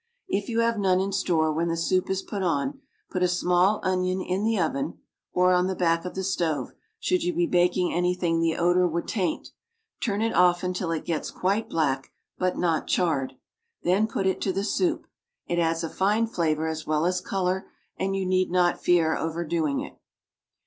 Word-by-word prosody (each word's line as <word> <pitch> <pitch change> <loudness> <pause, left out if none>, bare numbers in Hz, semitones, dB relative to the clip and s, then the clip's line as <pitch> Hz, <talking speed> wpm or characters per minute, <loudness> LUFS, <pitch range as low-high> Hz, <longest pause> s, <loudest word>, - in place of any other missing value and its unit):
If 200 +3 -2
you 230 0 +1
have 230 -1 +1
none 185 -2 +3
in 195 +1 -1
store 165 -5 +1
when 165 +2 0
the 165 0 -1
soup 185 +2 +1
is 190 0 -1
put 200 - -5
on, 180 - -1 0.3
put 185 - -2
a 180 - +4
small 180 +3 +2
onion 185 0 0
in 185 +2 -2
the 225 0 +1
oven 160 -3 -1 0.3
(or 180 0 +3
on 180 0 +3
the 190 - -2
back 165 -1 +1
of 180 - -6
the 190 - -2
stove; 170 -5 -1 0.3
should 365 -2 +1
you 350 -1 -1
be 345 +1 +2
baking 180 - +2
anything 175 -1 +1
the 165 -1 +1
odor 175 +1 +3
would 170 0 -3
taint); 190 -5 -2 0.5
turn 210 -2 0
it 225 0 0
often 180 0 +3
till 180 -1 -3
it 165 -1 -2
gets 165 -3 -2
quite 200 +4 -1
black, 135 -5 0 0.3
but 185 0 0
not 165 -3 0
charred. 160 -7 0 0.5
Then 195 +5 +3
put 195 - -2
it 190 - 0
to 195 - +1
the 195 +2 -2
soup; 335 - 0 0.4
it 175 - -1
adds 165 0 +1
a - - -1
fine 205 +7 +1
flavor 160 -7 0
as 160 -1 -4
well 155 +1 +1
as 180 +1 +1
color, 190 0 -1 0.3
and 195 0 -1
you 195 -1 -1
need 185 0 +1
not 175 0 +2
fear 165 -3 +3
overdoing 160 -2 -1
it. - - -9
180 Hz, 195 wpm, -26 LUFS, 165-190 Hz, 0.5 s, a